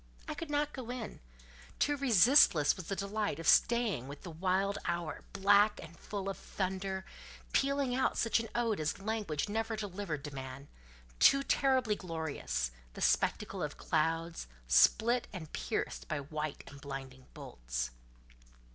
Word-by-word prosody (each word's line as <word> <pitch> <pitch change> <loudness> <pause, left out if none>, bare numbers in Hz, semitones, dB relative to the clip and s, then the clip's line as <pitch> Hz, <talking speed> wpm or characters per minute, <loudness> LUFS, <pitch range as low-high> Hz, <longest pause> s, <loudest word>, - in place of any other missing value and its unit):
I - - -3
could 330 - -6
not 295 0 0
go 255 -3 -7
in: 245 -3 -5 0.6
too 290 - +2
resistless 235 - +5
was 185 - -8
the 195 - -2
delight 205 +2 -2
of 165 -1 -5
staying 230 - +3
with 140 +1 -9
the 175 - -7
wild 190 +4 0
hour, 170 -3 -2
black 205 +2 +4
and 165 0 -10
full 200 +2 -5
of 195 - -3
thunder, 190 0 -3 0.5
pealing 275 -2 +2
out 260 +1 +1
such 230 0 +2
an 225 -1 -5
ode 230 -5 +1
as 155 +3 -1
language 205 -7 -2
never 225 +2 -1
delivered 195 -8 -4
to 150 - -6
man—too 130 - 0
terribly 260 -6 +2
glorious, 160 - -3 0.2
the - - -8
spectacle - - +1
of - - -3
clouds, 165 - -1 0.2
split 230 - +4
and 170 -6 -8
pierced - - -3
by 155 - -2
white 150 +1 -4
and 140 0 -12
blinding 135 -2 -8
bolts. - - -4
190 Hz, 145 wpm, -33 LUFS, 150-225 Hz, 0.6 s, resistless